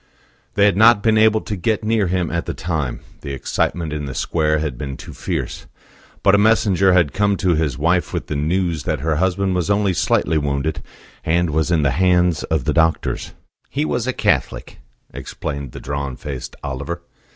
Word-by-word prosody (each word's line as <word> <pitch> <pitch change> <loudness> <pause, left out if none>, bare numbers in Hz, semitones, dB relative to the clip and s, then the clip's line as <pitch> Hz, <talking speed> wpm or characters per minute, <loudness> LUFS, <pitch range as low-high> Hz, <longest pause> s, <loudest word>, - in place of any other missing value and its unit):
They 100 - +4
had 100 -3 +3
not 110 -1 +6
been 110 -1 +3
able 110 0 +4
to 105 - -4
get 110 +4 -1
near 110 -2 +1
him 90 -2 -1
at 85 0 -2
the - - -3
time; 80 -8 -3 0.2
the 70 - -5
excitement 75 +4 -2
in 75 -1 -3
the 65 - -6
square 75 -2 +1
had 75 -4 -2
been 70 +1 -6
too - - -10
fierce; - - -4 0.6
but 95 - +5
a 100 - +5
messenger 100 -3 +4
had 85 -5 +3
come 100 -1 +1
to 90 -3 +2
his 75 -5 0
wife 85 +4 +1
with - - -3
the 75 - -4
news 85 +2 0
that - - -1
her 80 0 0
husband 95 +2 +1
was 90 0 -1
only 100 -1 +2
slightly 80 -2 +1
wounded, 70 +1 -2 0.4
and 85 0 +1
was 80 +1 0
in 85 -3 +2
the 70 - +2
hands 90 0 +2
of 80 -5 -1
the - - +1
doctors. 80 0 0 0.4
"He 145 +3 -1
was 120 -4 -1
a - - +2
Catholic," - - -1 0.3
explained 70 -4 -6
the - - -8
drawn 70 -1 -4
faced 65 -1 -7
Oliver. 70 +6 -5
85 Hz, 195 wpm, -20 LUFS, 75-95 Hz, 0.6 s, not